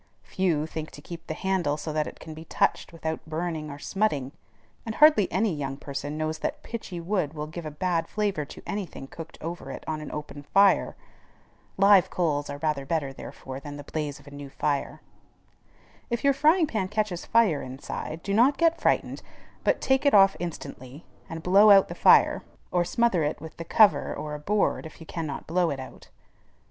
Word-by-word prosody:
Few 170 -5 0
think 160 -1 -6
to 145 - -11
keep 170 +1 -9
the 155 - -3
handle 180 -6 0
so 155 0 -5
that 155 0 0
it - - -9
can 160 - -9
be 160 +1 -10
touched - - 0
without 160 -1 -4
burning 160 -1 -3
or 140 - -7
smutting; 145 -6 -1 0.5
and 225 -1 -5
hardly 300 - +6
any 195 +1 +1
young 135 -2 -4
person 145 +1 -5
knows 155 0 -2
that - - -3
pitchy 205 -6 -6
wood 170 -4 -1
will 150 0 -4
give 160 +1 -7
a - - -3
bad 165 +2 -1
flavor 205 -7 -1
to - - -11
any 200 -2 -3
thing 135 - -9
cooked 165 +4 -10
over 170 +2 -6
it - - -7
on 155 -1 -3
an 150 - -7
open 150 -1 -7
fire. 195 +7 +3 0.8
Live 195 -1 +6
coals 150 -5 -1
are 140 - -5
rather 150 -2 -1
better, 140 -2 -2
therefore, 130 0 -8
than 145 +1 -8
the 145 - -8
blaze 145 -1 -4
of 140 - -19
a 140 - -12
new 140 -1 -8
fire. 140 +1 -2 1.1
If 235 -1 -2
your 280 0 +5
frying 310 +5 +4
pan 215 -9 -2
catches 210 -3 -2
fire 215 -11 +3
inside, 135 +4 -6
do 200 - -2
not 250 +7 +4
get 330 0 +2
frightened, - - +1 0.4
but - - +2
take 265 0 +2
it 285 -6 +4
off 195 -1 +7
instantly, 145 -4 -7 0.2
and 165 0 -6
blow 200 +4 +6
out 195 -1 +7
the - - -4
fire, - - +5 0.3
or 175 -1 +2
smother 190 -2 +1
it 150 - -2
with 160 +1 -10
the 165 - -6
cover 170 -6 +4
or 150 -1 -5
a 150 - -5
board 195 0 0
if 155 - -15
you 160 - -10
cannot 155 -4 -5
blow 175 +1 +1
it 140 -3 -3
out. 130 - -11
165 Hz, 200 wpm, -26 LUFS, 150-195 Hz, 1.1 s, off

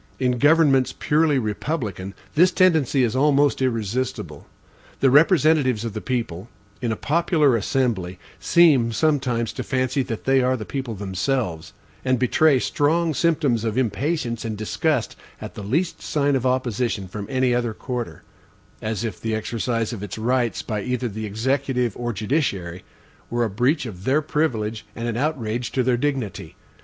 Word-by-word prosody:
In 125 -2 +1
governments 145 -3 +4
purely 150 -1 +2
republican, 105 - -3 0.2
this 180 +4 +5
tendency 160 -8 +3
is 120 0 0
almost 145 0 +3
irresistible. 125 +1 -2 0.5
The 135 - +4
representatives 145 - +4
of 115 - -4
the 110 - -5
people, 115 -6 -3 0.3
in 120 -2 -1
a - - 0
popular 155 - +2
assembly, 105 -6 -1 0.2
seem 145 -10 +4
sometimes 125 -4 0
to - - -4
fancy 130 +1 0
that 115 -3 -5
they 135 0 +3
are 130 +1 +1
the 110 - -6
people 130 -5 -4
themselves, 95 -2 -2 0.3
and 130 -1 +2
betray 135 +4 +3
strong 160 +5 +1
symptoms 140 -5 +1
of 110 0 -2
impatience 130 - -1
and 110 -2 -4
disgust 110 0 -1 0.2
at - - -8
the - - -8
least 150 - -1
sign 145 -2 +1
of 130 -1 0
opposition 120 -5 -1
from 100 +2 -7
any 130 -1 +1
other 120 -2 -1
quarter; 125 -1 -5 0.6
as 110 0 -3
if 110 -6 -5
the 110 -1 -1
exercise 115 +1 -2
of 110 - -6
its 105 -1 -6
rights, 120 +1 0
by 105 -3 -3
either 125 +2 -2
the 110 +1 -5
executive 125 +1 -1
or 120 0 -3
judiciary, 100 - -2 0.5
were 120 0 0
a 115 - 0
breach 130 +8 +1
of 95 -6 -8
their 140 +7 +2
privilege 115 -8 -1
and 115 0 -4
an 115 - -2
outrage 120 -4 -2
to 130 - +1
their 125 0 +2
dignity. 130 -5 -3
125 Hz, 160 wpm, -23 LUFS, 110-140 Hz, 0.6 s, this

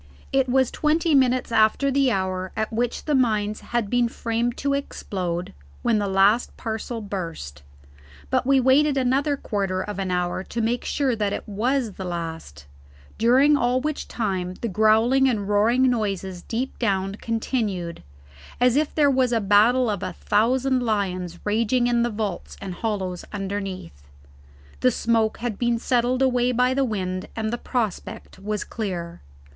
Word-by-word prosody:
It 270 -1 +2
was 260 0 +2
twenty 315 +1 +1
minutes 255 -3 +3
after 225 +5 +3
the 275 -1 +3
hour 185 -2 -2
at 220 +1 -2
which 240 +1 -2
the 300 - 0
mines 215 -5 +1
had 240 -3 -2
been 245 +2 +2
framed 230 +1 -2
to 280 -1 0
explode 180 -10 -3 0.3
when 225 -3 +2
the 205 - -1
last 195 +5 +3
parcel 225 +1 -4
burst; 165 - -6 0.7
but - - +2
we 270 +1 +4
waited 275 +3 +4
another 270 +3 +1
quarter 195 -6 -2
of 205 +1 -4
an 190 -1 -2
hour 180 0 -1
to 235 - -5
make 230 +2 0
sure 270 -4 0
that 210 -2 -1
it - - -5
was 235 +3 0
the 190 - -8
last, 165 - -6 0.5
during 260 +6 +5
all 250 -1 +2
which 300 +2 -3
time 185 -5 -2
the 235 - -1
growling 220 +6 +4
and 205 -5 -1
roaring 225 +5 +3
noises 195 -6 -2
deep 245 +6 -4
down 195 -4 0
continued, 210 -6 -3 0.6
as 250 0 +4
if 300 +1 0
there 290 -2 +4
was 260 -2 +2
a 230 - +2
battle 220 +5 +4
of 205 -4 -2
a - - -4
thousand 255 +5 +1
lions 185 -6 -2
raging 230 +4 +1
in 240 -1 +2
the 240 - +1
vaults 210 -4 -4
and 195 -2 -6
hollows 190 -3 -3
underneath. 195 - -5 0.8
The 255 - +4
smoke 225 -2 +1
had 235 -4 -4
been 240 -1 +1
settled 245 +2 +1
away 250 -1 +2
by 250 +1 +2
the 275 +1 +1
wind, 185 -6 -3
and 220 0 -2
the 240 - -2
prospect 220 -6 -4
was 210 +1 -3
clear. 175 -6 -5
225 Hz, 160 wpm, -24 LUFS, 195-250 Hz, 0.8 s, during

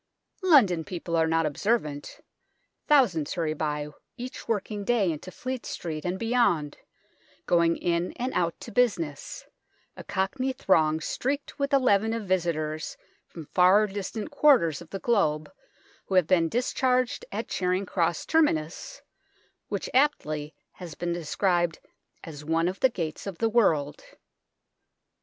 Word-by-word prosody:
London 245 - +5
people 170 0 -4
are 160 -1 +3
not 165 0 +2
observant. 150 -2 -2 0.7
Thousands 195 - +3
hurry 160 -3 -1
by 150 -1 -3 0.3
each 250 +1 -7
working 210 -2 -2
day 205 -5 +2
into 155 +4 -7
Fleet 255 +6 -5
Street 155 -3 -5
and 180 +1 -1
beyond, 225 -10 +1 0.7
going 170 -1 +3
in 170 0 -1
and 255 +1 -3
out 170 -2 0
to - - -8
business, 175 -11 -1 0.5
a - - -9
Cockney 255 +8 -1
throng 160 -9 +2
streaked 280 - -3
with 280 -1 -1
a 280 - +6
leaven 225 -4 +2
of 230 -1 -3
visitors 160 -4 -1 0.3
from 165 -3 -10
fer 190 +4 +5
distant 205 +5 -5
quarters 260 - +4
of - - -12
the 195 - -4
globe 185 -9 0 0.6
who 190 - -2
have 185 -3 +5
been 165 -1 +3
discharged 250 - 0
at 215 +3 -4
Charing 185 +1 -1
Cross 170 -3 -1
terminus, 295 - 0 0.6
which - - -3
aptly 155 - +1 0.2
has 175 -4 -10
been 175 0 -2
described 175 0 0 0.5
as 150 -2 -9
one 165 +2 +1
of 185 +2 -3
the 260 - +4
gates 165 -5 -5
of 190 -4 -5
the 225 - +1
world. 160 -11 +1
180 Hz, 140 wpm, -27 LUFS, 160-230 Hz, 0.7 s, a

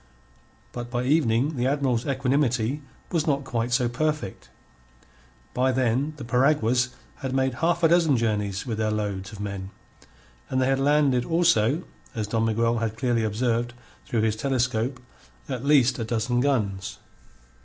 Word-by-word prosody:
But 120 0 -6
by 120 0 -1
evening 135 0 +2
the 125 +1 +1
Admiral's 135 -4 0
equanimity 135 -1 0 0.3
was 165 -3 0
not 140 -2 +1
quite 120 -2 -2
so 120 0 +2
perfect. 150 -4 -3 1.0
By 130 +1 +2
then 130 +4 0
the 140 - -7
piraguas 125 -1 +2 0.3
had 130 -2 -4
made 130 -1 +1
a - - -10
half 170 +1 +1
dozen 165 -4 +4
journeys 105 -3 -1
with 115 -4 -3
their 110 -1 +1
loads 100 -3 -3
of 105 - -10
men, 100 -2 -5 0.8
and 130 - 0
they 130 - +3
had 135 0 +2
landed 140 -3 +3
also 165 -3 +2 0.3
as 110 -2 -1
Don 110 +2 0
Miguel 115 +1 +1
had 110 -1 -2
clearly 120 -2 +1
observed 120 +2 -1 0.3
through 115 - 0
his 110 -1 +1
telescope 125 0 -1 0.5
at 130 -3 -4
least 135 -4 +4
a - - -1
dozen 115 +2 0
guns. 105 -8 -1
125 Hz, 155 wpm, -25 LUFS, 115-140 Hz, 1.0 s, dozen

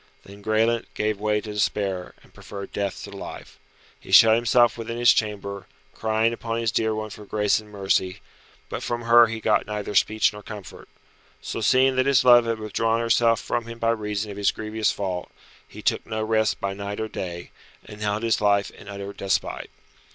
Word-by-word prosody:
Then 100 +1 -13
Graelent 110 +2 +1
gave 105 -1 -1
way 105 0 0
to 105 0 -7
despair, 100 -3 -2
and - - -23
preferred 100 -1 -9
death 100 -2 -3
to - - -9
life. - - -9 0.4
He - - -13
shut 110 -1 +8
himself 120 0 +3
within 115 0 -5
his 120 0 +6
chamber, 100 -3 -3 0.3
crying 110 +1 0
upon 115 0 -3
his 115 -2 0
dear 110 -1 0
one 110 0 -5
for 105 - -10
grace 105 0 +1
and 105 -1 -14
mercy, 95 -2 -1 0.5
but - - -5
from 120 0 -3
her 115 0 +7
he 115 0 -5
got 110 - +1
neither 105 0 -4
speech 110 +2 +3
nor 105 - -9
comfort. 105 -2 -10 0.5
So - - -5
seeing 130 +4 +3
that 130 +1 +2
his 135 -2 +4
love 120 -1 +7
had 115 -1 0
withdrawn 110 +1 0
herself 115 0 +3
from 115 -1 -3
him 115 0 -8
by 115 0 +1
reason 105 -2 -3
of 100 - -9
his 100 - +2
grievous 110 0 -1
fault, 95 -3 -4 0.4
he - - -12
took - - +1
no 110 0 -2
rest 110 0 +1
by 100 0 -2
night 100 +1 -5
or 110 - -2
day, 85 -4 -6 0.3
and 105 0 -11
held 105 +1 -1
his 115 -2 +1
life 100 -1 +2
in - - -15
utter 100 0 -7
despite. 100 -1 -2
110 Hz, 195 wpm, -24 LUFS, 100-115 Hz, 0.5 s, shut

